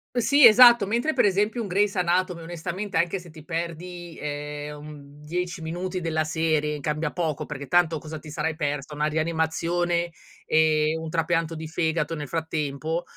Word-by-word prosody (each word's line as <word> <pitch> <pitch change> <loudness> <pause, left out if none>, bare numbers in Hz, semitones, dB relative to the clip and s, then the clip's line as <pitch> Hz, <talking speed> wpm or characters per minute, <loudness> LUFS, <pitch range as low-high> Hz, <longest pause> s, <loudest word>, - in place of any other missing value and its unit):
Sì 265 +3 +5
esatto. 235 -2 +8
Mentre 240 +9 0
per - - +3
esempio 210 +4 +1
un 205 - -5
Grey's 200 +2 +1
anatomy 180 -1 0
onestamente 175 +3 -4
anche 175 +3 +1
se 175 -1 -11
ti 155 -1 -13
perdi, 170 +1 -5
ehm, 150 0 -5
un 145 -1 -12
10 175 +3 -4
minuti 180 +3 -4
della 160 -2 0
serie, 155 -2 0
cambia 150 +1 -2
poco, 155 -3 -2
perché 140 -2 -7
tanto 170 -2 +3
cosa 155 +1 -7
ti 155 - -12
sarai 160 +1 -2
persa, 145 -1 -3
una 150 +1 -1
rianimazione 170 +2 0 0.3
e 155 0 +3
un 160 0 -6
trapianto 165 0 0
di 160 - -6
fegato 160 0 -1
nel 145 -2 -5
frattempo? 160 0 -2
165 Hz, 165 wpm, -25 LUFS, 155-175 Hz, 0.3 s, esatto